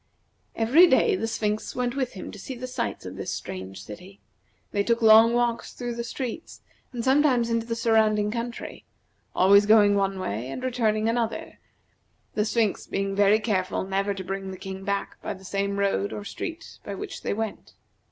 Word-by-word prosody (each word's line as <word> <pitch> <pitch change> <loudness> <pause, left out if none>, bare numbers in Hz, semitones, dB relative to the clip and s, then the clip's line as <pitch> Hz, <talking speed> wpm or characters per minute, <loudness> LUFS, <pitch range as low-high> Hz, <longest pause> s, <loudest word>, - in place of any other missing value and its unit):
Every 270 +11 +6
day 420 +4 +4
the 225 - -2
Sphinx 215 -1 -2
went 250 0 -1
with 260 -3 -2
him 190 - -7
to 210 - -11
see 260 - -7
the 250 +1 -6
sights 255 - -4
of - - -7
this - - -5
strange 95 +1 -6
city. 180 - -11 0.5
They 200 - +1
took 235 +1 +1
long 225 +2 +7
walks 240 -1 0
through 245 -1 -4
the 235 0 -4
streets, 250 +5 -6 0.3
and 240 -2 -4
sometimes 260 -3 +3
into 230 0 0
the 230 - -2
surrounding 220 -2 +2
country 235 +1 -5 0.5
always 200 +2 +6
going 210 -1 +6
one 195 -1 0
way 120 - -4
and 255 - -6
returning 225 -4 +1
another, 230 -1 -2 0.7
the 210 - +1
Sphinx 220 -2 0
being 195 0 -2
very 205 +1 +4
careful 195 -4 -1
never 195 +1 -1
to 190 - -5
bring 195 +1 -4
the 190 - -7
King 190 0 -7
back 200 0 -3
by - - -4
the 190 0 -15
same 200 +1 -2
road 200 0 0
or 205 - -5
street 330 - -7
by 200 - -5
which - - -7
they - - -2
went. 220 -1 -5
215 Hz, 185 wpm, -26 LUFS, 195-235 Hz, 0.7 s, long